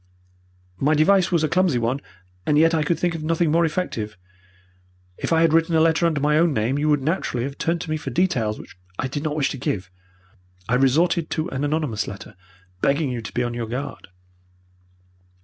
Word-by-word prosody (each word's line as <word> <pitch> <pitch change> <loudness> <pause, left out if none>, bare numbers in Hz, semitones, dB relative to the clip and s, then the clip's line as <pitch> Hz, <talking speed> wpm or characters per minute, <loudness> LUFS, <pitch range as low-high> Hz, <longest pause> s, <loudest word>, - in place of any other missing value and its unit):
My 150 +3 +3
device 185 +4 +4
was 170 -3 +2
a - - +3
clumsy 180 -5 +2
one, 120 +3 0 0.5
and 150 - +3
yet 165 +2 +5
I 160 - +2
could 155 +2 0
think 175 +1 0
of 160 -2 -5
nothing 165 0 +1
more 170 +1 +3
effective. 115 - -3 1.0
If - - -3
I 165 0 +4
had 165 -1 +4
written 165 0 +3
a - - +5
letter 165 +1 +3
under 155 -3 0
my 150 +2 +3
own 165 -3 +2
name, 115 +6 0
you 150 +1 +1
would 145 -2 +2
naturally 140 -6 -1
have 140 +2 -6
turned 165 0 0
to - - -6
me 155 - 0
for 145 - -6
details 120 -8 0
which - - -12 0.2
I 135 - -1
did 140 +2 -4
not 150 -1 -2
wish 150 -3 +1
to - - -5
give. 95 -7 -3 0.8
I 115 - -1
resorted 155 +6 +2
to 160 +3 -2
an 135 +1 -3
anonymous 145 -7 -1
letter, 100 +2 -9 0.5
begging 140 0 +1
you 120 -2 -3
to 110 - -8
be 125 - -1
upon 120 0 -2
your 120 -1 -4
guard. 130 +5 -5
150 Hz, 210 wpm, -23 LUFS, 130-165 Hz, 1.0 s, yet